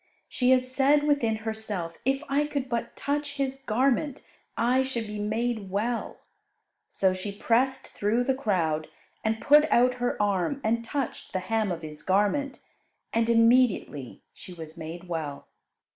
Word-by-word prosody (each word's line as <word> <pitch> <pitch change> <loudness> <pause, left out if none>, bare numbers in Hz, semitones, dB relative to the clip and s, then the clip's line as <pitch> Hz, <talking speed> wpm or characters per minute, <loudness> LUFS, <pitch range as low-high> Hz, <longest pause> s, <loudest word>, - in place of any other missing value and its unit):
She 250 -1 +1
had 255 -1 +5
said 275 +3 +3
within 285 -7 +2
herself, 210 -7 -3
"If 270 +2 +1
I 290 +2 +1
could 280 -3 -3
but 235 -1 -3
touch 290 0 -2
His 270 -1 -2
garment 270 +3 0 0.3
I 250 +3 +3
should 260 -4 -2
be 210 0 -6
made 220 0 -1
well." 225 +5 -2 0.7
So 190 -1 +2
she 185 +2 -4
pressed 255 +6 +1
through 220 +4 0
the 265 +1 +1
crowd, 170 - 0 0.4
and 220 0 0
put 300 +5 +5
out 250 +1 +4
her 245 - 0
arm 205 +6 +1
and 230 +2 +1
touched 275 +1 -4
the 185 - 0
hem 215 +1 0
of 165 -1 -4
His 150 -1 -8
garment, 210 +9 +1 0.5
and 230 0 +2
immediately 230 - +2
she 180 - -11
was 160 -1 -9
made 170 +2 -8
well. 155 -5 -4
230 Hz, 155 wpm, -27 LUFS, 195-265 Hz, 0.7 s, had